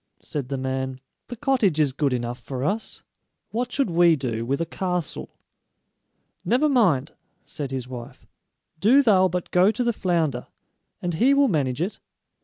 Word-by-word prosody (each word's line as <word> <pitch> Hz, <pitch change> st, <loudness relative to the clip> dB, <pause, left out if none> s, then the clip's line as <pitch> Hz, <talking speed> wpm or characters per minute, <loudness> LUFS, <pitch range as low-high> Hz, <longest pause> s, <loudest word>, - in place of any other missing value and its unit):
said 140 Hz, -4 st, -5 dB
the 135 Hz, -, -2 dB
man; 130 Hz, 0 st, -3 dB, 0.3 s
"the 245 Hz, -, -6 dB
cottage 235 Hz, -, +1 dB
is 145 Hz, -4 st, +2 dB
good 145 Hz, 0 st, 0 dB
enough 120 Hz, 0 st, -3 dB
for 130 Hz, +1 st, -5 dB
us; 210 Hz, +9 st, -2 dB, 0.5 s
what 245 Hz, +2 st, -2 dB
should 270 Hz, -9 st, 0 dB
we 170 Hz, -1 st, +5 dB
do 120 Hz, -5 st, -3 dB
with 135 Hz, +4 st, -1 dB
a 165 Hz, -, 0 dB
castle?" 180 Hz, -2 st, -3 dB, 1.1 s
"Never 260 Hz, +6 st, +2 dB
mind," 185 Hz, -, +2 dB, 0.3 s
said 145 Hz, -3 st, -5 dB
his 130 Hz, -2 st, -4 dB
wife; 125 Hz, -2 st, -9 dB, 0.5 s
"do 255 Hz, -, +5 dB
thou 190 Hz, -6 st, +5 dB
but 180 Hz, -1 st, -4 dB
go 180 Hz, +2 st, +5 dB
to 245 Hz, +3 st, -1 dB
the 235 Hz, -1 st, +1 dB
flounder, 165 Hz, -, -1 dB, 0.6 s
and 175 Hz, -1 st, -1 dB
he 255 Hz, +12 st, +4 dB
will 280 Hz, 0 st, +4 dB
manage 145 Hz, -, 0 dB
it." 195 Hz, -, -5 dB
165 Hz, 165 wpm, -24 LUFS, 130-220 Hz, 1.1 s, we